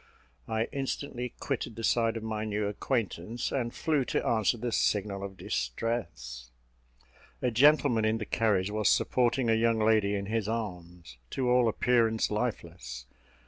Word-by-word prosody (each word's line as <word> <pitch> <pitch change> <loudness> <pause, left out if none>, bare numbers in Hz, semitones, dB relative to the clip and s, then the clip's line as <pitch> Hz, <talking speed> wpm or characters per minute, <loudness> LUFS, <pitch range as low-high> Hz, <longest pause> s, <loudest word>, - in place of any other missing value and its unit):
I 110 0 0
instantly 135 -2 -4
quitted 130 -5 -3
the 115 - -6
side 115 0 +2
of 110 - -6
my 110 -1 -3
new 105 -1 -1
acquaintance, 110 0 -2
and 120 -3 -1
flew 150 0 0
to - - -1
answer 110 +1 +2
the 120 +1 -3
signal 100 -2 0
of 95 -1 -7
distress. 60 - -3 0.9
A 125 - +2
gentleman 135 -2 +4
in 110 +1 +2
the 110 - -4
carriage 105 -4 +1
was 105 -2 +2
supporting 125 0 +2
a 115 - +4
young 115 0 +2
lady 110 -2 +3
in 100 0 -2
his 110 0 -1
arms, 90 - -5
to 125 -2 0
all 125 -1 +4
appearance 115 -1 +2
lifeless. 65 - -4
110 Hz, 150 wpm, -29 LUFS, 100-120 Hz, 0.9 s, gentleman